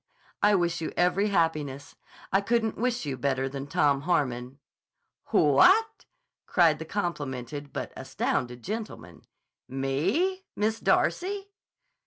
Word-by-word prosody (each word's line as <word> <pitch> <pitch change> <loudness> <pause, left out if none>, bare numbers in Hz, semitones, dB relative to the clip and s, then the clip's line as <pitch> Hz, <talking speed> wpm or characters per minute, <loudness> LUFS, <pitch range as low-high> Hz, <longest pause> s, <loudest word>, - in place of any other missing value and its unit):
"I 205 0 +5
wish 170 -2 0
you 160 - -3
every 180 +3 +2
happiness. 155 -7 -1 0.4
I 195 - +4
couldn't 225 +1 0
wish 245 -3 -1
you 135 -3 -3
better 135 +1 0
than 135 +1 -6
Tom 145 -1 +2
Harmon." 130 -5 -1 0.7
"What!" 375 - +4 0.4
cried 165 -5 +4
that 160 - -8
complimented 145 - -4
but - - -5
astounded 125 -1 -2
gentleman. 200 - -7 0.4
"Me? 180 - 0
Miss 220 +2 0
Darcy?" 395 +2 0
160 Hz, 115 wpm, -27 LUFS, 135-210 Hz, 0.7 s, I